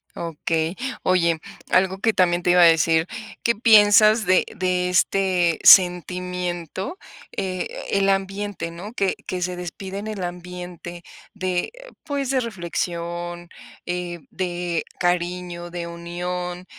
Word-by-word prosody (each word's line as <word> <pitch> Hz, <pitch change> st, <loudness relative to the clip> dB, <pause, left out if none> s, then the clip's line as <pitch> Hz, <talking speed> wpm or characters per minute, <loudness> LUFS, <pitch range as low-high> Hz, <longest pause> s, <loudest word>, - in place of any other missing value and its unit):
Okey. 165 Hz, +1 st, -2 dB, 0.3 s
Oye, 170 Hz, -3 st, +2 dB, 0.3 s
algo 190 Hz, +1 st, +2 dB
que 225 Hz, +2 st, +2 dB
también 175 Hz, -2 st, +2 dB
te 180 Hz, -, 0 dB
iba 180 Hz, 0 st, +5 dB
a -, -, +9 dB
decir, 165 Hz, 0 st, +4 dB, 0.4 s
¿qué 235 Hz, -, +3 dB
piensas 215 Hz, 0 st, +6 dB
de 185 Hz, 0 st, +4 dB
de 180 Hz, -1 st, 0 dB
este 180 Hz, -2 st, +2 dB
sentimiento?, 180 Hz, -, +3 dB, 0.4 s
eh, 185 Hz, -2 st, -2 dB, 0.2 s
el 195 Hz, 0 st, +2 dB
ambiente, 195 Hz, -2 st, -2 dB
¿no?, 180 Hz, +5 st, -8 dB
que 195 Hz, -5 st, 0 dB
que 180 Hz, -1 st, -3 dB
se 180 Hz, 0 st, -2 dB
despide 190 Hz, +2 st, -6 dB
en 210 Hz, -, -6 dB
el 210 Hz, -4 st, -4 dB
ambiente 175 Hz, -1 st, -7 dB, 0.3 s
de, 185 Hz, -, -2 dB, 0.3 s
pues, 280 Hz, -3 st, -2 dB
de 265 Hz, -, +2 dB
reflexión, 175 Hz, -4 st, -4 dB, 0.4 s
eh, 175 Hz, -1 st, -4 dB
de 175 Hz, -2 st, -2 dB, 0.2 s
cariño, 175 Hz, 0 st, -1 dB
de 175 Hz, 0 st, -5 dB
unión, 175 Hz, +1 st, -5 dB
180 Hz, 125 wpm, -23 LUFS, 175-195 Hz, 0.4 s, a